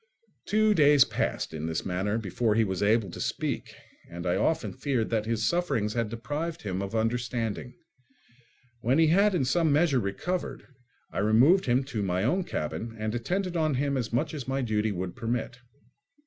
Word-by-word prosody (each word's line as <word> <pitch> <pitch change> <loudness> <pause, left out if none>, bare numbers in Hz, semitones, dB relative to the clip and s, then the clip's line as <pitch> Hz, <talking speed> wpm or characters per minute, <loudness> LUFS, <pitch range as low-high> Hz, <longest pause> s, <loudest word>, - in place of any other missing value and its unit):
Two 215 0 +3
days 145 -5 +6
passed - - -2
in 80 0 -4
this 80 0 -3
manner 95 +4 -1
before 110 +1 0
he 115 - +4
was 95 -3 -2
able 105 0 +2
to - - -7
speak, - - -3 0.3
and 85 +1 -7
I 90 - +1
often 160 0 0
feared 125 -7 -1
that 110 -1 0
his 115 -1 0
sufferings 115 -12 0
had 115 -2 -1
deprived 150 +8 -4
him 95 -2 -3
of 100 +3 -4
understanding. 115 +1 -2 1.0
When 125 +5 +1
he 160 -1 +5
had 200 +4 +4
in 145 -7 +1
some 160 +4 +2
measure 145 -2 +3
recovered, 145 - -3 0.5
I - - -3
removed 125 - +4
him 125 +2 +3
to 125 -6 -4
my 95 -1 0
own 180 - +1
cabin 115 -8 -4
and 110 0 -3
attended 180 +10 -2
on 155 -4 +1
him 140 +2 0
as 125 -4 -2
much 150 +7 0
as 140 -5 -6
my 135 0 -1
duty 110 -2 0
would 90 -1 -4
permit. 120 +1 -3
120 Hz, 180 wpm, -28 LUFS, 105-150 Hz, 1.0 s, days